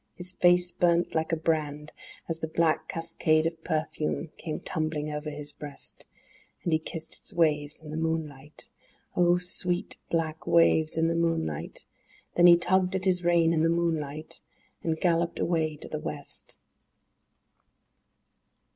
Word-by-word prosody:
His 180 +1 -2
face 180 -1 +4
burnt 170 0 +2
like 160 +1 0
a - - +3
brand 155 -2 -1 0.4
As 165 -1 -2
the 160 - -3
black 160 0 +1
cascade 165 -1 +1
of 165 0 -3
perfume 155 0 -2
came 155 -2 -5
tumbling 155 -1 -2
over 150 +1 -4
his 145 0 -5
breast; 145 -1 -9 0.6
And 170 - 0
he 155 - +4
kissed 160 0 -6
its - - -7
waves 150 -2 +1
in 150 - -8
the 155 - -4
moonlight, 155 -3 -4 0.5
(Oh, 175 0 +4
sweet, 180 0 -2
black 160 -1 -2
waves 160 -1 +4
in 165 0 +3
the 165 - +1
moonlight!) 165 - -2 0.5
Then 175 0 +6
he 170 0 +9
tugged 185 +1 +2
at 190 0 -2
his 180 -2 +2
rein 170 -1 +4
in 160 - +2
the 165 - +3
moonliglt, 160 -3 -2 0.4
and 160 -1 -1
galloped 170 -1 +1
away 160 -3 0
to 150 - -9
the 155 - -4
West. 145 -1 -7
160 Hz, 150 wpm, -28 LUFS, 155-170 Hz, 0.6 s, he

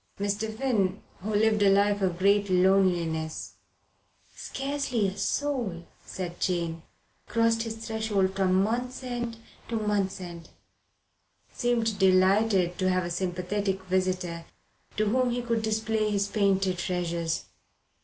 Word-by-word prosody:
Mr. 205 +2 -1
Finn, 215 -5 0 0.2
who 205 - -4
lived 215 0 +2
a 200 - +6
life 200 +1 +3
of 180 -3 0
great 200 +2 +3
loneliness 180 -4 +1 0.8
scarcely 270 -6 -2
a 190 - -4
soul, 240 -15 -2 0.2
said 175 -2 -6
Jane, 170 -3 -1 0.5
crossed 230 0 +2
his 225 -1 -4
threshold 210 -4 0
from 190 0 +3
month's 245 +4 -2
end 240 -2 -4 0.3
to 235 - -2
month's 205 -3 0
end 170 -2 -9 1.0
seemed 230 -4 0
delighted 190 -1 +3
to 185 0 +2
have 185 0 +1
a 175 - -4
sympathetic 190 +2 -2
visitor 185 -2 -1 0.5
to 215 - +2
whom 250 +4 +2
he 245 0 -2
could 230 -2 0
display 220 0 0
his 200 -1 0
painted 195 -3 +1
treasures. 170 -2 -2
200 Hz, 125 wpm, -27 LUFS, 185-220 Hz, 1.0 s, a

